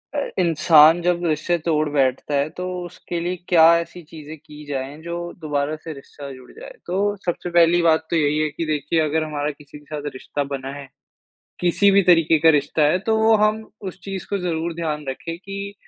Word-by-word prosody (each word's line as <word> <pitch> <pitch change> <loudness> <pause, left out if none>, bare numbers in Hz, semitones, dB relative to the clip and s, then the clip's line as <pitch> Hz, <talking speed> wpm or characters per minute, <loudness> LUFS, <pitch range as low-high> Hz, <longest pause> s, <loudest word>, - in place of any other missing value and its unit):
अ, - - +1 0.2
इंसान 165 -1 +5
जब 175 0 0
रिश्ते 160 +2 0
तोड़ 155 -2 +1
बैठता 140 0 0
है 140 +2 +1
तो 180 - -4 0.2
उसके 175 0 -6
लिए 175 +2 -2
क्या 170 -3 +6 0.2
ऐसी 170 +1 -8
चीज़ें 155 0 -11
की 150 0 -14
जाए 140 0 -5
जो 170 +1 -5 0.2
दोबारा 150 -1 -2
से 160 +1 -8
रिश्ता 140 0 -11
जुड़ 130 -1 -14
जाए, - - -11
तो 200 +3 0
सबसे 175 0 -3
पहली 170 0 +4
बात 160 -1 +2
तो - - 0
यही 150 -2 +2
है 155 0 +1
कि 155 +3 -5
देखिए 150 +1 -1
अगर 155 +1 0
हमारा 150 -1 -3
किसी 150 0 -13
के 150 - -22
साथ 145 0 -4
रिश्ता 145 +2 -4
बना 135 0 -5
है, 140 -1 -9 0.7
किसी 180 +3 +3
भी 200 0 +5
तरीके 165 -1 +4
का 165 +1 +5
रिश्ता 145 +2 -2
है, 175 +5 +2
तो 220 +3 0
वो 220 0 +4
हम 215 +1 0
उस 190 -1 -7
चीज़ 195 -2 -6
को 200 - 0
ज़रूर 170 -2 -2
ध्यान 155 -3 -3
रखें 165 +5 -6
कि 200 +2 -7
160 Hz, 205 wpm, -21 LUFS, 150-175 Hz, 0.7 s, क्या